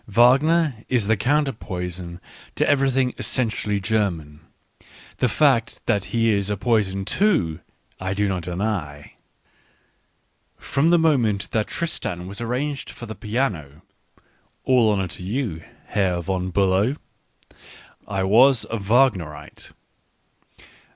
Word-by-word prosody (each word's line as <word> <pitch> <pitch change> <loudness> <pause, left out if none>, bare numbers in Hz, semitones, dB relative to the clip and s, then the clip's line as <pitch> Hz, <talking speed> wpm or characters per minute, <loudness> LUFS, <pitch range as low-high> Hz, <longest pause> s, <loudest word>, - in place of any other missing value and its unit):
Wagner 130 +4 +3
is 125 -5 +1
the 110 +2 +3
counter 140 +7 +1
poison 90 -5 -6 0.4
to - - +1
everything 135 -2 +2
essentially 110 -4 -1
German 90 -8 -2 0.4
— - - -23
the 125 - +2
fact 130 -2 +2
that 100 -1 +1
he 115 -1 +1
is 100 -1 0
a 105 - -1
poison 100 -3 0
too, 105 - +1 0.4
I 95 +1 -3
do 105 0 +1
not 95 -2 -2
deny. 85 -5 -4 1.4
From 140 +4 0
the 175 - +5
moment 125 -11 +1
that 110 -2 0
Tristan 90 - -4
was 100 +4 -7
arranged 135 +5 -3
for 120 - -9
the 110 - -6
piano 105 - -3 0.4
— - - -39
all 120 -4 +4
honour 95 -2 0
to 85 - -7
you, 100 - -3 0.2
Herr 95 -4 0
von 95 +1 -2
Biilow! 100 - +2 0.6
— - - -22
I 95 - +1
was 120 +6 +5
a 115 - -2
Wagnerite. 95 - 0
105 Hz, 130 wpm, -23 LUFS, 95-125 Hz, 1.4 s, the